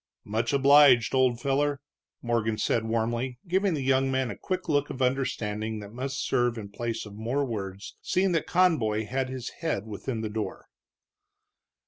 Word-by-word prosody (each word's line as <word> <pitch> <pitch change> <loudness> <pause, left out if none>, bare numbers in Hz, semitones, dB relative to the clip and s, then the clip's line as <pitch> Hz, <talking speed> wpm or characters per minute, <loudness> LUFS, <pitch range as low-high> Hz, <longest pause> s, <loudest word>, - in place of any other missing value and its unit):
"Much 110 +3 -1
obliged, 140 -3 +6
old 130 -3 +3
feller," 140 +2 0 0.4
Morgan 115 -2 0
said, 110 +1 0
warmly, 115 +3 -1
giving 190 0 +1
the 140 - -3
young 135 0 +2
man 130 -2 0
a - - -6
quick 185 -1 -4
look 145 -2 +1
of 130 - -6
understanding 110 -5 -1
that 100 0 -10
must 135 +2 -3
serve 120 -1 +1
in 105 -2 -6
place 115 +2 -4
of 105 - -10
more 120 +7 -1
words, 100 -4 -6
seeing 190 +1 +1
that 165 -2 0
Conboy 115 -13 +2
had 130 +3 -2
his 130 -2 -5
head 160 -11 -1
within 110 +2 -4
the 110 - -2
door. 105 -2 -4
125 Hz, 165 wpm, -27 LUFS, 110-140 Hz, 0.4 s, obliged